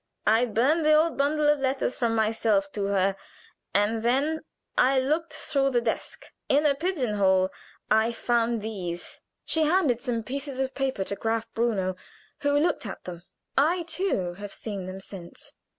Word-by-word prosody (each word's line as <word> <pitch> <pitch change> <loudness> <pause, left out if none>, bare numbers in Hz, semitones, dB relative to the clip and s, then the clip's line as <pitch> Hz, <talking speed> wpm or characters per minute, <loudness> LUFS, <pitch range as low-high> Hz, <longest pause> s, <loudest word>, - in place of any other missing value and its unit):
I 225 +3 +4
burned 265 +9 +2
the 305 0 +5
old 315 +1 +3
bundle 295 +2 +2
of 295 -1 +4
letters 265 -1 0
from 230 -2 0
myself 215 -3 +1
to 200 -1 -2
her, 195 -1 +2 0.6
and 210 +3 +1
then 275 +7 +1 0.3
I 260 +1 +4
looked 310 +6 0
through 275 -2 0
the 245 -3 +2
desk. 235 - -3 0.2
In 290 +2 +4
a 290 - +5
pigeon 285 - -1
hole 190 -1 +3 0.4
I 220 +2 +4
found 235 -1 0
these." 180 -6 -5 0.2
She 320 -1 +2
handed 300 -8 +2
some 240 -4 -2
pieces 275 +3 -5
of 265 0 -1
paper 265 -7 -1
to 200 - -4
Graf 225 +1 -2
Bruno, 205 -6 0 0.4
who 285 0 +2
looked 295 -6 +1
at 190 - -7
them. 175 -2 -7 0.3
I, 335 +6 +3
too, 325 - -1
have 205 -1 -7
seen 200 -4 -5
them 190 +1 -7
since. 185 -3 -9
235 Hz, 165 wpm, -26 LUFS, 205-285 Hz, 0.6 s, the